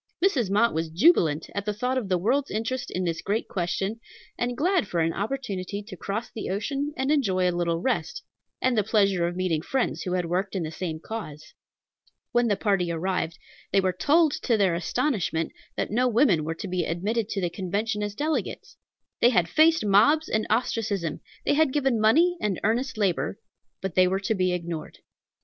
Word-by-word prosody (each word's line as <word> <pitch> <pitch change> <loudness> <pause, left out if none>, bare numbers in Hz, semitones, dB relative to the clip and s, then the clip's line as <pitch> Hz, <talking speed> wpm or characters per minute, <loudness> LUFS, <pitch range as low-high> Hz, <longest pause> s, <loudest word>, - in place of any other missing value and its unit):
Mrs. 255 - +2
Mott 215 +4 +3
was 160 0 -2
jubilant 165 - +3
at 200 -1 -3
the 210 -1 -2
thought 250 +4 -1
of 240 -7 -2
the 185 - +3
world's 260 +10 +1
interest 230 +4 -3
in 185 - -2
this 165 -2 -2
great 215 +3 -1
question, 195 +4 -2 0.4
and 245 0 -2
glad 355 - +2
for 175 - -2
an 165 0 +1
opportunity 205 -4 -3
to 205 -2 -9
cross 205 +6 -4
the 220 - -5
ocean 275 +9 -2
and 265 +2 0
enjoy 190 -11 +2
a 180 - +1
little 170 -1 0
rest, 265 - -2 0.4
and 255 -1 +3
the 210 - +3
pleasure 195 -5 +2
of 175 - -4
meeting 180 -4 0
friends 260 +9 -1
who 180 - -3
had 180 -1 0
worked 185 +4 -2
in 185 - -1
the 155 - -4
same 165 -2 -4
cause. 160 -6 -7 0.8
When 240 0 +3
the 205 - +2
party 195 -4 0
arrived, 170 0 -2 0.3
they 195 - +4
were 185 -1 +1
told, 310 - +3
to 235 -4 +2
their 195 -4 +3
astonishment, 170 - -1 0.3
that - - -2
no 250 +4 +2
women 225 - +3
were 160 +1 -3
to 200 - -6
be 180 -1 -1
admitted 205 +7 -1
to 195 - -2
the 175 -2 -1
Convention 205 +4 -2
as 205 -1 -3
delegates. 305 +5 -3 0.4
They 240 - +6
had 180 -8 +2
faced 315 - +4
mobs 230 +11 +4
and 215 0 0
ostracism; 210 -7 -1 0.3
they - - +3
had 305 -1 +3
given 265 -5 +1
money 330 +12 +4
and 200 -4 -1
earnest 245 +4 0
labor, 195 -1 0 0.5
but 190 -3 -2
they 185 +1 +5
were 190 +1 0
to 220 +3 0
be 185 -3 +1
ignored. 170 -3 -4
205 Hz, 195 wpm, -26 LUFS, 180-240 Hz, 0.8 s, They